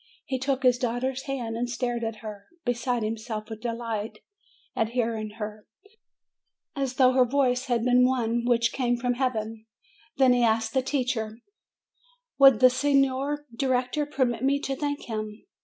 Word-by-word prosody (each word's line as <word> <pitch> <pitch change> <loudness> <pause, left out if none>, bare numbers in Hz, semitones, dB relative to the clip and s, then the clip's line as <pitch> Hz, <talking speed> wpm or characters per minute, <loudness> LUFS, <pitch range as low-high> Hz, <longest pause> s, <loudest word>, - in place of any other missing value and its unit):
He 260 -1 -2
took 270 +1 -1
his 250 -1 +4
daughter's 255 +2 -2
hands, 245 -5 -3
and 240 +1 -2
stared 240 -1 -2
at 225 -1 -4
her, 205 -2 -8 0.2
beside 245 -1 0
him 220 +1 -2
self 220 -1 -6
with 220 -1 -7
delight 230 -2 -4 0.6
at 225 -3 0
hearing 225 -2 -1
her, 210 -1 -7 1.1
as 270 -2 -2
though 255 -1 +5
her 255 0 +5
voice 255 0 +1
had 240 -2 0
been 250 0 +5
one 240 -2 +1
which 235 -1 +2
came 245 -2 0
from 245 +1 0
Heaven; 225 -3 -3 0.5
then 260 -2 +5
he 245 - +2
asked 225 -1 +1
the 265 - +2
teacher, 245 -5 -2 1.0
"Would 270 -4 +7
the 255 - +9
Signer 275 +1 +1
Director 260 +3 0
permit 255 -5 -1
me 280 +1 +2
to 275 - -2
thank 285 +1 -3
him?" 215 -1 -5
245 Hz, 160 wpm, -26 LUFS, 225-260 Hz, 1.1 s, the